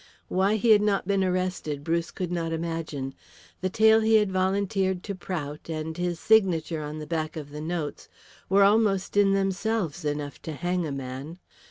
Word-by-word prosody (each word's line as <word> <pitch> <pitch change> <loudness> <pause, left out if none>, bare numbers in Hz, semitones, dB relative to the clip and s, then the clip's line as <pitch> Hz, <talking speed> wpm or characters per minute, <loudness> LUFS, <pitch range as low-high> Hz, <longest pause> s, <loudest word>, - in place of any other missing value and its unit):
Why 195 +3 +2
he 220 +2 +3
had 210 -1 +7
not 200 -3 +1
been 195 -1 +2
arrested 180 -6 -2
Bruce 170 +1 0
could 180 -2 -4
not 165 -2 -2
imagine. 160 -5 -3 0.5
The 185 - 0
tale 220 +3 +5
he 220 0 +3
had 210 -3 +3
volunteered 190 0 0
to 200 - -4
Prout 160 -5 -5
and 160 0 -4
his 175 -1 -2
signature 175 -7 +3
on 150 +1 -5
the 155 - -6
back 155 -1 -3
of 145 -2 -7
the 150 +1 -6
notes 160 -2 -4 0.4
were 195 +1 +5
almost 200 -2 +3
in 200 -1 +5
themselves 195 -3 -1
enough 145 -1 -3
to 160 - -5
hang 175 +2 -1
a - - -4
man. 135 +4 -6
175 Hz, 180 wpm, -26 LUFS, 155-195 Hz, 0.5 s, had